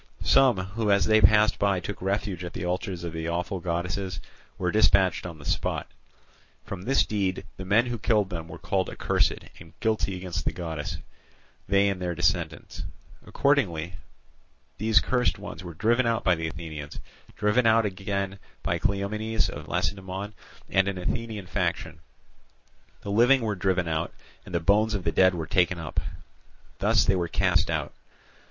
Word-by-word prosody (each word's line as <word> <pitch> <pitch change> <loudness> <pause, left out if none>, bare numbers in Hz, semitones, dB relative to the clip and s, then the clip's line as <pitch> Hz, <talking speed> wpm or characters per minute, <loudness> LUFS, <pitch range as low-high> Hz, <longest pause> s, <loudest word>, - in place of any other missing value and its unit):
Some 130 -6 +5
who 100 +4 -2
as 100 -1 +4
they 110 0 +5
passed 105 +3 +5
by 100 -2 +2
took 95 +1 -6
refuge 95 -1 -2
at 85 - -6
the 90 - -4
altars 90 0 -3
of 85 -1 -5
the 80 0 -3
awful 90 +3 -2
goddesses 90 +1 -2 0.4
were 90 -2 0
dispatched 95 -4 +3
on 85 -2 -8
the 70 - -13
spot. - - -1 0.8
From 95 -2 -6
this 135 +8 +2
deed 95 -3 -1
the 95 - -6
men 105 +5 +4
who 120 -2 -3
killed 105 -3 +2
them 80 -2 -5
were - - -9
called - - -1
accursed - - +1 0.3
and 80 -1 -15
guilty 110 -4 0
against 90 -1 -4
the - - -1
goddess, 80 -4 -4 0.7
they 100 +1 +4
and 95 -2 -1
their 90 -1 -2
descendants. - - -1 0.5
Accordingly 90 - +1 0.9
these 110 +1 +4
cursed 125 -1 +1
ones 105 -1 -8
were 85 -2 -8
driven 115 +7 +2
out 115 0 0
by 90 - +4
the 80 -1 -2
Athenians, 80 -3 -7 0.4
driven 110 +3 +3
out 115 0 +5
again 95 0 -3 0.2
by - - 0
Cleomenes 105 +3 0
of - - -8
Lacedaemon 95 +1 -2 0.3
and 95 0 +2
an 100 -1 -2
Athenian 110 +2 -3
faction; - - -2 1.0
the 100 - -5
living 120 +5 +5
were 110 -2 0
driven 95 -2 0
out, 80 0 -1 0.4
and - - -5
the - - +3
bones 105 +5 +3
of 95 - -3
the 80 - +1
dead 95 +3 +4
were 80 -2 -3
taken 90 +1 +2
up; 80 -4 -3 0.8
thus - - +3
they 95 - +3
were 90 -2 0
cast 90 +1 +2
out. 80 -4 -2
95 Hz, 170 wpm, -26 LUFS, 85-105 Hz, 1.0 s, Some